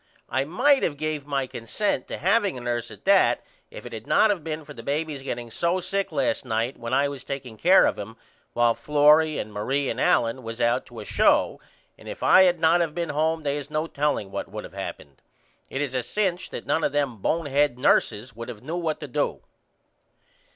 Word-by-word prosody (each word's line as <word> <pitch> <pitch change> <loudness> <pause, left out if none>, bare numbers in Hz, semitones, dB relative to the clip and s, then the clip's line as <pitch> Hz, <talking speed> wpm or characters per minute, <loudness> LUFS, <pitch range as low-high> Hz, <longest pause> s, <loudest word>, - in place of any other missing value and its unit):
I 130 +2 0
might 265 - +3
of 145 - -1
gave 155 -1 -3
my 140 -2 -1
consent 130 - -2
to - - -5
having 195 - +1
a - - -7
nurse 120 -1 -2
at - - -13
that 195 0 +4 0.3
if - - -10
it - - -8
had - - -8
not 215 - +4
of 185 -6 -3
been 155 -1 -5
for - - -10
the 115 - -9
baby 150 +4 -2
getting 120 -3 -5
so 170 +9 0
sick 195 +1 -2
last 150 - 0
night 115 +1 -1
when 115 0 -7
I 140 +2 +3
was 140 -2 -7
takeing 130 -4 -6
care 180 - +5
of - - 0
him 110 +3 -8 0.4
while 120 -1 +3
Florrie 150 +6 +4
and 105 0 -5
Marie 135 +7 -1
and 120 - -4
Allen 115 +2 +2
was 115 0 -7
out 120 0 +1
to - - -9
a - - -9
show - - +2 0.4
and - - -11
if - - -7
I 190 - +7
had 175 -2 +2
not 165 +2 +4
of 160 -3 -2
been 170 -1 -2
home 160 +2 0
they 145 0 -1
is 145 0 -6
no 155 +1 -1
telling 145 -10 -1
what - - -5
would - - -7
of - - -12
happened. 70 -2 -8 0.5
It 135 - -3
is 135 -3 -4
a 130 - 0
cinch 185 - -2
that - - -7
none 160 - 0
of 145 - 0
them 140 -5 0
bonehead 145 - +1
nurses 120 -2 +1
would 115 +2 -7
have 110 -4 -9
knew 165 +3 -4
what 160 -3 -2
to 150 - -5
do. 125 - -2
145 Hz, 220 wpm, -25 LUFS, 120-165 Hz, 0.5 s, I